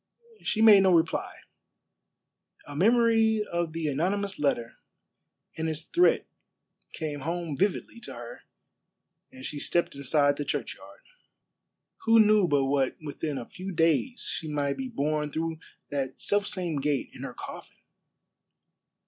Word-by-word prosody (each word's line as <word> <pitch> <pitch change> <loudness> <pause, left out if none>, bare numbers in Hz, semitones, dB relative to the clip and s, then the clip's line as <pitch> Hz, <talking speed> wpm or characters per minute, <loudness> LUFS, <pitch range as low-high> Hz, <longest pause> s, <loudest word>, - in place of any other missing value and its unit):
She 220 - 0
made 210 -3 +9
no 190 -2 +5
reply. 165 -1 0 1.3
A 145 - -9
memory 225 +2 +3
of 170 -3 -2
the 165 -1 -3
anonymous 190 +7 -1
letter 120 -5 -1 0.8
and 160 0 -2
its 155 0 -4
threat 350 - +3 0.7
came 150 -3 -4
home 165 +1 -3
vividly 200 - -1
to - - -9
her - - -9 0.9
as 260 0 -10
she 145 - -5
stepped 175 +4 0
inside 145 +1 +2
the 145 - -2
churchyard. - - -5 1.0
Who 225 0 +6
knew 210 -3 +5
but 145 -3 +2
what 135 -1 +1
within 150 -1 -4
a 120 - -5
few 185 +8 -7
days 165 - +1
she 160 - -4
might 145 -1 -1
be 265 - -3
borne 150 - -1
through 160 +1 -3 0.3
that 135 -2 -3
self 205 0 +1
same 175 -5 -1
gate 145 -1 -1
in - - -11
her - - -6
coffin? - - -9
165 Hz, 140 wpm, -28 LUFS, 145-205 Hz, 1.3 s, made